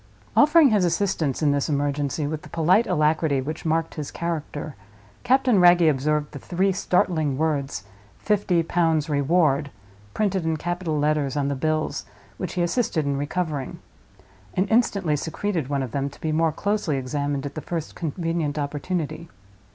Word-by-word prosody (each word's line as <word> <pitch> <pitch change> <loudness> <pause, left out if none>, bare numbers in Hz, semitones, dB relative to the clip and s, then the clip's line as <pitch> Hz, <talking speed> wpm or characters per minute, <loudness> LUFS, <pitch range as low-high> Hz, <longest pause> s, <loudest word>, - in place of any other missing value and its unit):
Offering 300 -2 +6
his 210 -3 +3
assistance 170 -5 0
in 145 - +4
this 140 +1 0
emergency, 145 0 -1
with 155 +1 -3
the - - -13
polite 180 +7 +3
alacrity 155 -2 +2
which 155 +5 -4
marked 165 +1 0
his 150 -3 -5
character, 155 -3 -4 0.5
Captain 250 -3 +3
Wragge 175 -1 +6
observed 150 +1 +1
the 145 - -8
three 185 +7 0
startling 170 -6 +1
words, 145 -7 -1 0.3
"Fifty 195 -5 +1
Pounds 165 -2 +1
Reward," 145 -1 +2 0.5
printed 195 -4 0
in 160 -1 0
capital 175 -1 -2
letters 150 -1 0
on 140 -1 0
the 140 - -1
bills 155 +1 -1 0.3
which 185 - -4
he 180 - 0
assisted 175 - 0
in 140 0 0
recovering; 145 -1 -3 0.8
and 190 +2 +1
instantly 200 -9 +2
secreted 165 +1 -2
one 140 -1 -1
of 125 - -6
them, 140 0 -1
to 140 - -17
be 160 - -2
more 160 +1 +2
closely 200 -4 -1
examined 140 +1 -2
at 140 - -5
the 155 - -5
first 165 -1 -4
convenient 165 -2 -2
opportunity. 150 +3 -3
155 Hz, 160 wpm, -24 LUFS, 145-175 Hz, 0.8 s, Offering